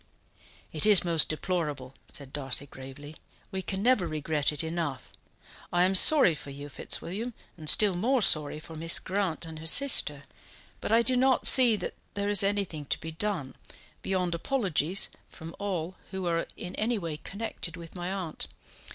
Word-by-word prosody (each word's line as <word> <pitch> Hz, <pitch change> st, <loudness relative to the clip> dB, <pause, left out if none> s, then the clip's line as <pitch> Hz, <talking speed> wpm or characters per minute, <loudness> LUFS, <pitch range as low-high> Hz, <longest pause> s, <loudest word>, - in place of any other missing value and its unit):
"It 155 Hz, -, -1 dB
is 205 Hz, -4 st, +6 dB
most 165 Hz, -3 st, +4 dB
deplorable," 150 Hz, -6 st, -3 dB, 0.2 s
said 140 Hz, -2 st, -8 dB
Darcy 140 Hz, -1 st, -1 dB
gravely. 140 Hz, +3 st, -12 dB, 0.3 s
"We 190 Hz, -1 st, -3 dB
can 190 Hz, +1 st, -4 dB
never 240 Hz, -7 st, +2 dB
regret 155 Hz, -1 st, 0 dB
it 150 Hz, +1 st, -3 dB
enough. 160 Hz, -4 st, -5 dB, 0.6 s
I 175 Hz, 0 st, +2 dB
am 185 Hz, +1 st, +2 dB
sorry 230 Hz, -, +7 dB
for 145 Hz, -, -9 dB
you, 145 Hz, +1 st, -9 dB
Fitzwilliam, 210 Hz, -, -4 dB, 0.2 s
and 155 Hz, -3 st, -1 dB
still 210 Hz, -3 st, +6 dB
more 240 Hz, +6 st, +1 dB
sorry 150 Hz, -3 st, +5 dB
for 160 Hz, -, -12 dB
Mrs. 165 Hz, +1 st, 0 dB
Grant 185 Hz, -4 st, -2 dB
and 160 Hz, -1 st, -9 dB
her 160 Hz, -, -6 dB
sister, 160 Hz, -, +4 dB, 0.6 s
but -, -, -5 dB
I 230 Hz, +1 st, +4 dB
do 255 Hz, +1 st, +4 dB
not 260 Hz, +1 st, +2 dB
see 245 Hz, -4 st, +7 dB
that -, -, -5 dB, 0.2 s
there 200 Hz, 0 st, -2 dB
is 205 Hz, -1 st, +6 dB
anything 195 Hz, -7 st, -2 dB
to -, -, -2 dB
be 160 Hz, -, -7 dB
done, 165 Hz, -5 st, -4 dB, 0.5 s
beyond 180 Hz, -2 st, -2 dB
apologies 185 Hz, -, -1 dB, 0.2 s
from 165 Hz, +1 st, -11 dB
all 185 Hz, -4 st, -4 dB, 0.2 s
who 190 Hz, -1 st, -5 dB
are 170 Hz, -1 st, -1 dB
in 180 Hz, -, -7 dB
any 230 Hz, +2 st, 0 dB
way 165 Hz, -6 st, -5 dB
connected 195 Hz, -2 st, -5 dB
with 170 Hz, -1 st, -11 dB
my 180 Hz, 0 st, -5 dB
aunt. 185 Hz, -5 st, -4 dB
175 Hz, 170 wpm, -28 LUFS, 155-200 Hz, 0.6 s, sorry